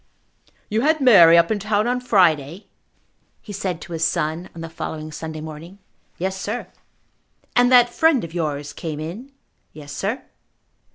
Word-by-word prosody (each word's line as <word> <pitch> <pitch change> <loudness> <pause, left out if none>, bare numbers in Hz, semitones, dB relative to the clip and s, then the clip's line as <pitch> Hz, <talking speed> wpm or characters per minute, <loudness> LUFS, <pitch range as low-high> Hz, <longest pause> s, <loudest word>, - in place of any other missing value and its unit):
"You 220 +2 0
had 310 +3 +2
Mary 175 - +7
up 170 +3 +3
in 215 - 0
town 210 +1 0
on 250 +1 0
Friday," 175 - +2 0.7
he 205 - -10
said 185 -4 -3
to 175 - -9
his 165 0 -2
son 160 +2 -1
on 165 - -8
the 165 - -5
following 155 -1 -6
Sunday 155 0 -7
morning. 160 +4 -9 0.4
"Yes, 190 +2 -3
sir." 225 +4 -4 0.9
"And 245 +1 +4
that 245 -1 +6
friend 320 -6 +3
of 165 -1 -8
yours 145 -4 -3
came 155 -1 -6
in?" 195 - -7 0.4
"Yes, 145 -1 -10
sir." 215 +7 -3
175 Hz, 160 wpm, -21 LUFS, 160-220 Hz, 0.9 s, Mary